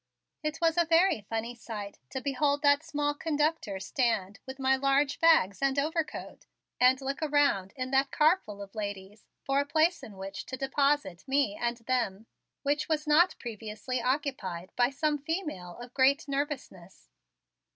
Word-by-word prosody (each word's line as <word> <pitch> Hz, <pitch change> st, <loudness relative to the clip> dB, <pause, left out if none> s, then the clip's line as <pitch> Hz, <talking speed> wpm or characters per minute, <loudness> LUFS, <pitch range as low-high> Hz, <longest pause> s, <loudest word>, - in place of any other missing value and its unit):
It 305 Hz, +1 st, -2 dB
was 330 Hz, 0 st, +2 dB
a 340 Hz, -, +4 dB
very 330 Hz, -, +4 dB
funny 225 Hz, +1 st, -2 dB
sight 210 Hz, -4 st, -7 dB
to 265 Hz, -, -4 dB
behold 285 Hz, +2 st, 0 dB
that 285 Hz, 0 st, +5 dB
small 295 Hz, -2 st, -1 dB
conductor 295 Hz, -9 st, -1 dB
stand 200 Hz, -4 st, -1 dB
with 265 Hz, 0 st, -7 dB
my 265 Hz, 0 st, +3 dB
large 275 Hz, +1 st, +1 dB
bags 295 Hz, -, +4 dB
and 275 Hz, 0 st, +1 dB
overcoat 315 Hz, +3 st, -3 dB, 0.3 s
and 255 Hz, +1 st, +5 dB
look 275 Hz, +2 st, -3 dB
around 285 Hz, -11 st, +2 dB
at 255 Hz, 0 st, -3 dB
that 270 Hz, +1 st, +3 dB
car 320 Hz, +5 st, +4 dB
full 205 Hz, -1 st, -8 dB
of 195 Hz, -, -13 dB
ladies 205 Hz, -1 st, -6 dB, 0.2 s
for 275 Hz, 0 st, +1 dB
a 285 Hz, -, +1 dB
place 320 Hz, +3 st, +2 dB
in 205 Hz, -3 st, -11 dB
which 195 Hz, +1 st, -7 dB
to 260 Hz, -, -5 dB
deposit 275 Hz, -8 st, 0 dB
me 270 Hz, -6 st, +1 dB
and 235 Hz, +2 st, -2 dB
them, 230 Hz, -5 st, -1 dB, 0.4 s
which 290 Hz, +2 st, 0 dB
was 305 Hz, -1 st, 0 dB
not 315 Hz, +5 st, +4 dB
previously 225 Hz, +2 st, -5 dB
occupied 250 Hz, -, -2 dB
by 245 Hz, 0 st, +3 dB
some 295 Hz, +2 st, 0 dB
female 300 Hz, -, -4 dB
of 245 Hz, +1 st, -10 dB
great 280 Hz, +3 st, +3 dB
nervousness. 275 Hz, -, -5 dB
270 Hz, 160 wpm, -29 LUFS, 215-295 Hz, 0.4 s, that